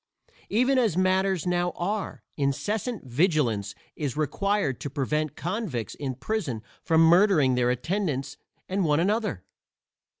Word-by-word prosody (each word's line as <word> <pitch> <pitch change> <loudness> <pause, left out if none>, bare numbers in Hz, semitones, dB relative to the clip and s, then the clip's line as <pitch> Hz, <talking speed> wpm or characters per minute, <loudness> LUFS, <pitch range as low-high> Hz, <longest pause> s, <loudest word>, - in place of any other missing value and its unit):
Even 255 +5 +3
as 215 -9 +1
matters 185 -1 +2
now 175 0 +1
are, 200 +4 -3
incessant 180 - -2
vigilance 120 - +1 0.2
is 145 -3 -3
required 195 -1 0
to 145 - -3
prevent 150 +2 -1
convicts 175 - -3
in 135 -3 -4
prison 135 - -3 0.2
from 160 0 +3
murdering 165 -5 +5
their 125 -1 +2
attendants 145 - -1 0.3
and 190 +1 0
one 150 -2 +2
another. 200 - 0
165 Hz, 125 wpm, -26 LUFS, 135-200 Hz, 0.3 s, murdering